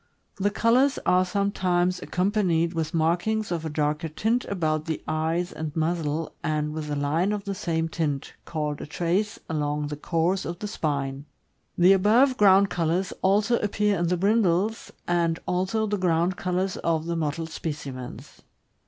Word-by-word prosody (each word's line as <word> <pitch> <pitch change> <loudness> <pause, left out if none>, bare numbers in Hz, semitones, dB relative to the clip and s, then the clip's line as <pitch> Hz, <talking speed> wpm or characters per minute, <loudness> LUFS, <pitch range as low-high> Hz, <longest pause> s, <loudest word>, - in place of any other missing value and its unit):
The 200 +1 +1
colors 240 +6 +3
are 180 0 +4
sometimes 185 -2 0
accompanied 180 -3 +1
with 160 -2 -2
markings 175 +6 0
of 165 -2 -2
a - - -3
darker 150 +1 -1
tint 225 +10 0
about 155 -5 -1
the 160 -2 -3
eyes 165 +3 -1
and 155 -1 -5
muzzle, 160 -1 -1
and 150 -1 -1
with 155 -1 -5
a 145 - -1
line 150 +7 +1
of 210 -1 -2
the 200 - -3
same 165 -4 -1
tint 150 -4 -3
(called 150 -2 -3
a - - -6
"trace") 180 +7 -1
along 150 -1 -1
the 150 - -4
course 170 +5 0
of 170 +1 -5
the 210 - -5
spine. 140 -6 -2 0.5
The 180 +2 +7
above 225 +8 +4
ground 200 -2 +5
colors 175 +2 0
also 205 +5 +3
appear 210 0 +1
in 170 - +1
the 180 +1 +1
brindles, 200 +1 +1 0.2
and 170 -1 +1
also 190 +5 0
the 205 -1 -1
ground 175 0 +1
colors 185 +1 -1
of 160 -1 0
the 170 0 -2
mottled 160 0 -2
specimens. 140 -6 -7
170 Hz, 160 wpm, -26 LUFS, 155-195 Hz, 0.5 s, The